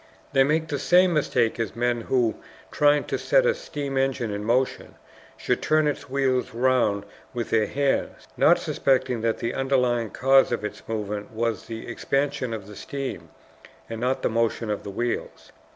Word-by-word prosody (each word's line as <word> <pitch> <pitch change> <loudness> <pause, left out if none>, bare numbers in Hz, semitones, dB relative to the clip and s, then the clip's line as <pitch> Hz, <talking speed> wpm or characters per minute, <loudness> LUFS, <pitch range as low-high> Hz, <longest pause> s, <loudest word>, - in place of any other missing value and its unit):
They 135 -1 +5
make 155 +3 +1
the 145 - -2
same 180 +4 +4
mistake 125 -7 +1
as 110 -3 -2
men 120 0 0
who, 120 -2 +1 0.4
trying 145 0 +3
to - - -3
set - - +3
a 485 - +4
steam 145 - -4
engine 135 -4 0
in 100 0 -4
motion, 125 +4 0 0.4
should - - -1
turn 155 0 +2
its 145 -1 -2
wheels 130 -3 0
round 120 -5 +2 0.3
with 120 -1 -3
their 110 -2 +3
hands, 140 -1 -1
not - - +5
suspecting 130 -3 0
that 115 0 0
the 115 - -3
underlying 125 -4 +1
cause 135 +5 +4
of 120 -3 -2
its - - -6
movement 105 -2 -4
was 115 -2 -2
the 115 -1 -7
expansion 135 +1 -1
of 110 -3 -5
the 105 +1 -11
steam, 135 +5 -6 0.6
and 115 0 -6
not 130 +1 0
the - - +2
motion 115 -1 0
of 105 - -2
the - - -8
wheels. 120 +4 -4
125 Hz, 175 wpm, -25 LUFS, 115-135 Hz, 0.6 s, They